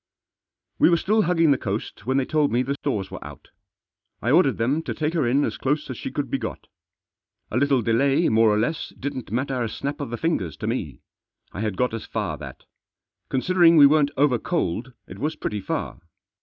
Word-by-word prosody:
We - - +6
were 170 - +4
still 215 +6 +2
hugging 165 -4 +3
the 140 - +2
coast 105 0 -5
when 130 +1 +2
they 135 - +1
told 150 0 +1
me 120 +2 +2
the 135 +2 -2
stores 110 -9 -3
were - - -7
out. - - -12 0.7
I 120 - 0
ordered 145 -5 +4
them 130 +7 +1
to - - -5
take 155 +1 -1
her 155 -8 +1
in 140 +4 +2
as - - -4
close 150 +1 -1
as 125 - -6
she - - -4
could - - -4
be - - 0
got. - - -6 0.9
A 110 - -1
little 135 -2 +2
delay 135 +8 +2
more 110 0 +4
or 105 - +2
less 125 +8 -1
didn't 130 -6 -5
matter 130 +2 -1
a 115 - -1
snap 140 +6 -4
of 145 - -4
the 120 - -4
fingers 110 - -1
to - - -5
me. - - -3 0.5
I 100 - -6
had 105 -3 -2
got 125 -2 0
as 115 - -5
far 105 -8 -3
that. - - -10 0.7
Considering 170 +4 +4
we 145 - +9
weren't 145 0 +4
over 135 -4 +3
coaled 130 - -2
it 95 - -10
was 150 +5 -2
pretty 105 - -3
far. - - -4
135 Hz, 210 wpm, -24 LUFS, 115-150 Hz, 0.9 s, we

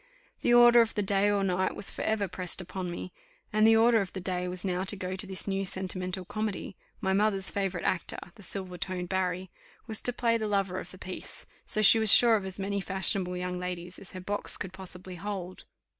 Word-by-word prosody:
The - - +2
order 240 0 +8
of 225 -1 -1
the 210 - 0
day 200 +1 +2
or 200 -1 +1
night 185 0 0
was - - 0
for - - -7
ever 215 -2 0
pressed 180 +1 -3
upon 180 0 -4
me 175 +1 -6 0.4
and 215 +1 +5
the 225 - +6
order 225 0 +5
of 190 - -5
the 190 - -4
day 180 0 -2
was 180 +1 -5
now 185 -1 -1
to 195 - 0
go 185 -1 -4
to 195 +1 0
this 190 -1 -1
new 195 0 -1
sentimental 185 -1 -4
comedy 215 -1 -4 0.3
my 190 0 +1
mother's 195 -1 +2
favourite 190 -3 -2
actor, 185 - -1 0.2
the 210 - -16
silver 185 -2 -5
toned 180 0 -4
Barry, 185 -1 -2 0.3
was 220 -2 -1
to 245 - +2
play 235 -1 +1
the 215 - -2
lover 195 -3 0
of - - -9
the 185 - -12
piece; 185 0 -7 0.2
so 215 - +2
she 225 +2 +8
was 220 -2 +6
sure 235 -2 +8
of 200 -3 -2
as 190 +1 -1
many 200 +1 -2
fashionable 190 -1 -1
young 180 0 -3
ladies 180 0 -6
as 195 - -11
her 185 - -6
box 205 +3 -2
could 190 -1 -6
possibly 185 -1 -4
hold. 185 -1 -6
190 Hz, 225 wpm, -29 LUFS, 180-205 Hz, 0.4 s, order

